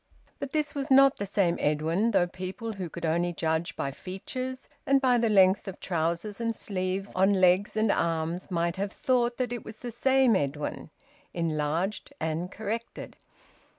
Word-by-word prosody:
But 275 - -5
this 305 -1 -1
was 280 -1 -3
not 275 0 +6
the 200 - -3
same 185 -3 +1
Edwin, 160 +8 +1
though 190 -5 +3
people 185 +6 -6
who 185 -4 -5
could 170 +1 -5
only 170 +2 +1
judge 160 0 -1
by 140 - -2
features, 255 - -6 0.2
and 275 0 +4
by 250 -3 +3
the 230 -1 +2
length 190 -1 +4
of 190 - -6
trousers 170 +5 -2
and 230 -1 -1
sleeves 190 0 -3
on 190 +2 +3
legs 185 +3 +3
and 215 -1 +3
arms, 165 +2 -1
might 170 0 -1
have 200 +1 -2
thought 240 -1 +1
that 245 -2 -1
it 240 - -5
was 220 0 -10
the 240 +1 -6
same 260 0 +3
Edwin 145 -1 -2 0.5
enlarged 165 +4 -1
and 160 +3 -2
corrected. 220 +3 -5
190 Hz, 170 wpm, -28 LUFS, 170-230 Hz, 0.5 s, not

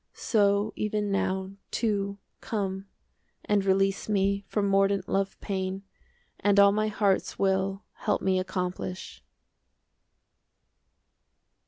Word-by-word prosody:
So 205 -1 +2
even 210 -1 -1
now, 190 -1 -1 0.2
too, 200 -3 -1 0.2
Come 195 -2 -3 0.6
and 205 -1 +2
release 195 +1 +1
me 200 -1 +1
From 205 -2 0
mordant 195 -1 +2
love 195 0 -1
pain, 190 -1 -3 0.6
And 205 0 +3
all 200 0 +8
my 215 +1 +1
heart's 205 -2 0
will 195 0 0
35 - - -15
Help 210 - +1
me 190 -1 +2
accomplish! 185 0 -4
195 Hz, 110 wpm, -28 LUFS, 190-205 Hz, 0.6 s, all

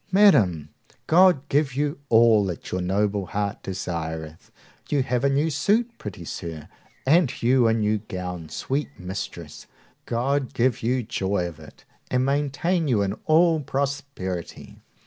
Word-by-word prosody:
Madam, 105 - +4 0.4
God 170 -4 +4
give 140 -2 +1
you 145 0 -1
all 115 -2 +5
that 90 -4 -6
your 90 - -1
noble 100 +1 0
heart 100 +1 -3
desireth! 80 -4 -5 0.4
You 145 -3 +2
have 125 0 -1
a 140 - +4
new 145 +4 +1
suit, 225 - +1
pretty 90 -4 -7
sir; 80 -2 -6 0.4
and 155 -2 +2
you 125 0 +4
a 110 - +3
new 105 -1 +1
gown, 90 -5 -6
sweet 135 - -2
mistress; 95 +2 -7 0.4
God 135 +3 -1
give 125 0 +1
you 125 +2 0
joy 95 -3 -1
of 80 -3 -10
it, 75 - -15 0.2
and 125 0 +1
maintain 145 +5 0
you 110 -7 +2
in 100 - -1
all 165 0 +4
prosperity! 140 - -4
120 Hz, 145 wpm, -24 LUFS, 95-140 Hz, 0.4 s, all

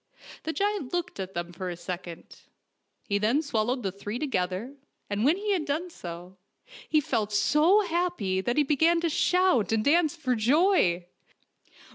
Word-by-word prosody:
The 320 - -1
giant 400 -6 -2
looked 350 - -3
at 190 0 -5
them 175 0 -4
for 185 +1 -5
a 175 - -6
second. 175 -1 -8 0.6
He 200 -1 -1
then 235 +9 +2
swallowed 245 -2 -1
the 195 - -1
three 205 +4 -6
together, 210 -3 -2 0.4
and 205 +1 0
when 305 +8 +4
he 415 +1 -2
had 355 -5 0
done 325 +5 -2
so, 175 - -9 0.5
he 310 - +4
felt 230 -8 -1
so 305 - +4
happy 345 - -1
that 240 +6 -2
he 300 - +5
began 320 +4 +3
to 335 - +1
shout 360 - +2
and 220 -1 +1
dance 315 +1 +3
for 280 -6 -1
joy. 235 - +3
250 Hz, 165 wpm, -27 LUFS, -, 0.6 s, he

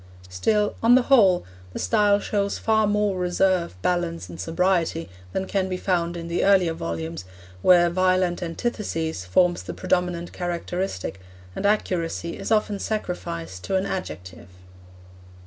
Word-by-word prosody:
Still, 210 - +1
on 235 +2 +6
the 255 - +4
whole, 200 -10 +4 0.3
the - - -5
style 205 - +3
shows 200 -1 -1
far 220 -1 +2
more 205 -2 +1
reserve, 180 - +1
balance 170 - -1
and 85 0 -7
sobriety, 165 - 0 0.2
than 190 - -2
can 190 -1 -1
be 185 - -2
found 175 -2 -1
in 170 0 -6
the 170 +1 -1
earlier 185 -4 +4
volumes 85 - -5 0.4
where 175 - +6
violent 185 0 +1
antithesis 165 - -3
forms 175 - +2
the - - -7
predominant 180 -2 -1
characteristic, 175 - -3 0.3
and 200 - 0
accuracy 170 -5 -1
is - - -6
often 210 -2 +1
sacrificed 90 - -4
to 190 - -1
an 190 +1 +1
adjective. 95 - -6
180 Hz, 140 wpm, -24 LUFS, 165-195 Hz, 0.4 s, on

